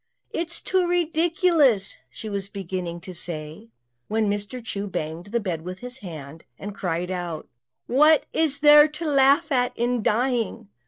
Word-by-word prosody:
"It's 340 +1 -4
too 370 -1 +1
ridiculous," 330 - +2
she 215 - -9
was 200 -1 -3
beginning 180 -3 -5
to 185 - -9
say, 155 -7 -5 0.4
when 220 0 0
Mr. 205 +4 -5
Chu 205 -3 -4
banged 160 -1 -5
the 235 +3 -1
bed 180 -7 -3
with 180 +2 -7
his 250 +1 -6
hand, 160 - -9
and 205 +1 -7
cried 180 -2 -3
out, 175 -3 -4 0.4
"What 300 +5 +4
is 290 -3 +1
there 295 0 +8
to 310 +2 -7
laugh 275 -1 +4
at 250 -2 +1
in 240 0 0
dying?" 235 - 0
220 Hz, 155 wpm, -24 LUFS, 180-285 Hz, 0.4 s, there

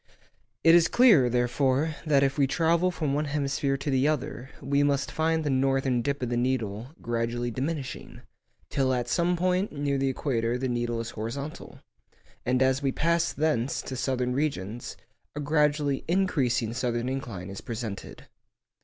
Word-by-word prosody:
It 165 - +7
is 170 -1 +6
clear, 205 - +5
therefore, 130 +5 +1
that 140 -2 +4
if 135 0 +1
we 140 -2 +3
travel 170 +4 +2
from 155 -6 -2
one 150 +2 0
hemisphere 140 -1 -1
to 140 +1 -3
the 135 +2 +3
other 130 -3 -2
we 140 +1 +1
must 140 -1 +1
find 160 0 +1
the 145 - 0
northern 135 -1 +1
dip 140 +1 -2
of 125 - -1
the 120 - 0
needle 120 -3 -1 0.2
gradually 120 +1 -1
diminishing, 135 +2 -4 0.5
till 130 -1 +1
at 120 -1 -2
some 175 +1 +1
point 185 +3 +1
near 140 -1 -1
the 135 0 +1
equator 120 -3 -1
the 130 +1 -2
needle 120 -1 -1
is 115 +1 -6
horizontal; 125 +8 -6 0.7
and 125 +1 +3
as 130 +1 +2
we 135 -2 +1
pass 170 +3 +1
thence 145 -5 0
to 130 - -5
southern 125 0 -1
regions, 120 -6 -3 0.4
a - - -3
gradually 150 -1 +1
increasing 135 - +1
southern 120 -1 -1
inclination 115 -9 -5
is 100 - -7
presented. 115 -4 -6
135 Hz, 160 wpm, -27 LUFS, 120-150 Hz, 0.7 s, It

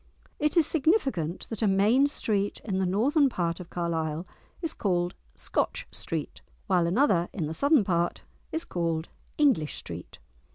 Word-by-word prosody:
It 300 +3 +1
is 330 - +6
significant 270 - +1
that 225 - -4
a 220 - +3
main 210 +8 +4
street 205 -8 -1
in 190 -4 -1
the 190 - +1
northern 275 - +3
part 170 -6 -1
of 180 - -9
Carlisle 165 -1 -2 0.3
is 330 -3 -3
called 175 -3 0 0.2
"Scotch - - -1
Street," - - -4 0.2
while 175 -2 +2
another 185 -4 +3
in 170 - -2
the 155 - -3
southern 280 - +4
part 175 -2 0 0.3
is 325 +1 -2
called 165 -2 -2 0.3
"English 255 - +3
Street!" - - -8
195 Hz, 155 wpm, -28 LUFS, 170-275 Hz, 0.3 s, is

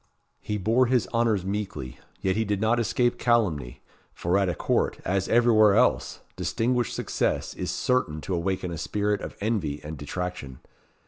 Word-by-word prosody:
He 105 - -3
bore 115 +6 +3
his 125 -1 +2
honours 115 -5 +2
meekly, 85 -11 -4 0.2
yet 95 -1 +1
he 110 - +1
did 105 -2 -1
not 110 +3 +2
escape 120 +2 +1
calumny; 90 - 0 0.3
for 85 +2 0
at 95 -2 +1
a - - -2
court, - - 0
as 95 +1 0
everywhere 110 -4 +5
else, - - +2
distinguished 120 +1 0
success - - -1
is - - -4
certain 125 -12 0
to 95 - -4
awaken 90 +1 -1
a 85 - -5
spirit 105 +3 -1
of - - -7
envy 95 -10 -1
and 75 -1 -7
detraction. 75 -3 -5
100 Hz, 165 wpm, -26 LUFS, 85-115 Hz, 0.3 s, everywhere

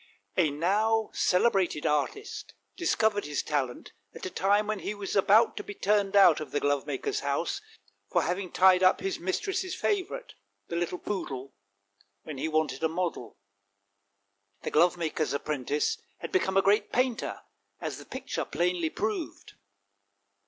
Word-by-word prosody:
A 170 -4 +3
now 210 +9 +1
celebrated 185 -5 +2
artist 415 - -2 0.2
discovered 220 - +1
his 150 0 -2
talent 135 -5 -2 0.2
at - - -7
a 185 - -4
time 205 +2 +2
when 215 -1 -2
he 210 - -4
was 200 -1 -4
about 210 +3 +5
to - - -4
be 205 - -8
turned 205 0 +1
out 190 -6 +7
of 155 - -6
the 145 - -1
glovemaker's 145 -1 -1
house 140 - -1 0.5
for - - +2
having 180 0 -2
tied 185 0 +5
up 185 0 +5
his 195 - -2
mistress's 370 - -2
favourite, 415 +5 -2 0.4
the 170 - -3
little 175 +1 -1
poodle, 140 -10 -5 0.7
when 150 -4 -7
he 160 - -1
wanted 155 -4 0
a 160 - +3
model. 165 - -3 1.3
The - - -3
glovemaker's 165 -2 +2
apprentice 145 0 -1 0.2
had - - -7
become 195 - +1
a 195 - +5
great 205 +2 +3
painter, 250 -1 0 0.4
as - - -4
the - - -11
picture - - -4
plainly 175 -1 0
proved. 215 +4 -4
185 Hz, 145 wpm, -28 LUFS, 155-210 Hz, 1.3 s, out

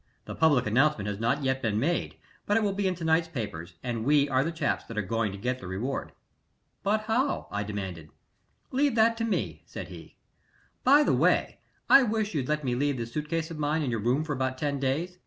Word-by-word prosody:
The - - -6
public 145 -6 +3
announcement 115 -1 +2
has 105 -1 -3
not 135 +6 0
yet 130 0 0
been 105 -2 0
made, 170 +8 -1 0.3
but 205 - +3
it 225 - +2
will 200 -2 +1
be 200 0 0
in 185 - 0
to 170 - -8
night's 160 +1 +3
papers, 90 - -6
and 120 -3 -2
we 145 +2 +4
are 130 -1 +2
the 165 - -2
chaps 165 -3 -1
that 115 - -9
are 105 - +1
going 115 +1 -1
to 100 - -7
get 125 +5 -2
the 90 - -8
reward." 110 +9 -3 0.7
"But 215 +2 +1
how?" 235 +6 0
I 100 - -2
demanded. 95 -6 -5 0.6
"Leave 275 -1 +2
that 230 0 +4
to 230 - -2
me," 225 - -2
said - - -7
he. - - -11 0.7
"By 285 +4 +6
the - - +2
way, - - +2 0.3
I 275 - +8
wish 220 -4 0
you'd 140 -4 -2
let 150 0 0
me 125 -2 0
leave 140 +2 0
this 115 0 -5
suit 150 0 -3
case 165 0 -2
of 155 - -6
mine 150 +1 0
in 130 - -1
your 115 - -1
room 125 +8 +1
for 155 -2 -3
about 130 -1 -2
ten 140 0 -1
days. 160 +7 -2
145 Hz, 230 wpm, -28 LUFS, 115-170 Hz, 0.7 s, I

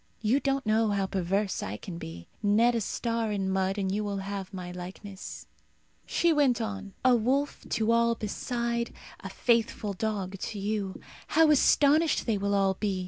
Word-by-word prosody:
You 230 +6 +3
don't 275 -2 0
know 220 +1 +3
how 200 -1 +1
perverse 190 +2 -1
I 100 +2 -4
can 170 - -8
be. 85 - -8
Knead 220 +3 +4
a 230 - 0
star 230 +1 -1
in 195 -2 -1
mud, 190 +1 0
and 190 -2 -1
you 210 +1 -1
will 200 -1 -2
have 195 -1 -5
my 180 -2 -6
likeness." 185 +2 -8 0.6
She 340 -1 +3
went 275 -6 +3
on, 205 -3 -5
"A 255 -1 +7
wolf 265 +5 0
to 225 0 +1
all 235 0 +3
beside; 235 +2 -2 0.2
a - - -7
faithful 230 -3 +1
dog 195 -2 -3
to 210 - -4
you. 200 -1 -2 0.3
How 320 0 +5
astonished 300 +2 +4
they 220 -4 0
will 200 0 0
all 195 -1 +3
be! 195 -1 -2
210 Hz, 175 wpm, -28 LUFS, 195-235 Hz, 0.6 s, A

